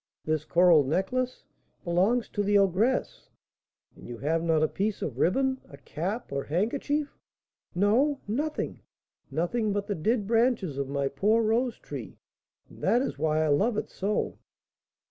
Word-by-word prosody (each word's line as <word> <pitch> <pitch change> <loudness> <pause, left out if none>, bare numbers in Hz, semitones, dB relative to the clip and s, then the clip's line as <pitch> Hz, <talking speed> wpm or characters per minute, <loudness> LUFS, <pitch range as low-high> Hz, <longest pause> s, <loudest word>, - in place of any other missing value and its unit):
"This 155 -1 -1
coral 170 -4 +5
necklace?" 245 - -1 0.4
"Belongs 195 +7 +2
to 205 - -2
the 205 0 +3
ogress." 200 +6 +1 0.7
"And - - -13
you 120 - -7
have 160 +6 0
not 165 -2 +2
a - - +4
piece 205 +4 -2
of 130 -4 -4
riband, 265 - +1
a 140 - -12
cap, 195 - -4
or 140 0 -2
handkerchief?" 280 - -1 0.6
"No, 245 +10 +2
nothing, 295 +9 -2 0.5
nothing 210 +7 -1
but 200 0 -1
the 205 - -2
dead 205 +6 0
branches 225 - +1
of 135 -1 -2
my 140 0 0
poor 210 +12 +2
rose 230 +3 +1
tree; - - -8 0.5
and - - -16
that 245 +2 +3
is 270 - -4
why 155 0 +1
I - - +1
love 205 +10 +2
it - - -3
so." 205 +2 -2
200 Hz, 155 wpm, -28 LUFS, 160-235 Hz, 0.7 s, coral